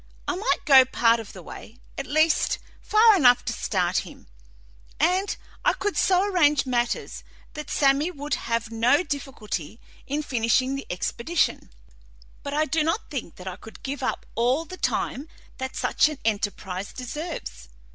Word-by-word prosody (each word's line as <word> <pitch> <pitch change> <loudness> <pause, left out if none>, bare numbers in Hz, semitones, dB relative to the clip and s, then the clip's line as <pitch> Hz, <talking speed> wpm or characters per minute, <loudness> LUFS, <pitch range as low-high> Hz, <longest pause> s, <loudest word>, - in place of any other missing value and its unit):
I - - +1
might 410 +6 -1
go 270 -3 +9
part 235 -2 +3
of 225 - -8
the 185 - -11
way 220 +7 -11 0.2
at - - -5
least, 310 +3 +2 0.2
far 435 0 +5
enough 250 -9 +5
to - - -1
start - - 0
him - - -10 0.7
and 365 +5 +1 0.3
I - - +4
could 410 - -2
so 370 0 +3
arrange 300 -9 +3
matters 240 -2 -2 0.3
that 300 0 -7
Sammy 280 +3 +3
would 295 -3 -5
have 230 -1 -2
no 245 +8 +3
difficulty 240 - -5 0.3
in 295 +2 -2
finishing 255 0 +1
the 275 - -5
expedition, 235 - -1 0.7
but 285 - -5
I 310 +1 +2
do 310 +2 +1
not 330 +8 -2
think 250 - -5
that 185 - -11
I 185 0 -5
could 220 - -13
give 275 +1 -4
up - - -2
all 250 +8 +1
the 370 - -9
time 285 -5 -2 0.3
that 260 0 -4
such - - +2
an 305 - -6
enterprise 200 -3 -2
deserves. 295 - -6
275 Hz, 160 wpm, -25 LUFS, 230-310 Hz, 0.7 s, go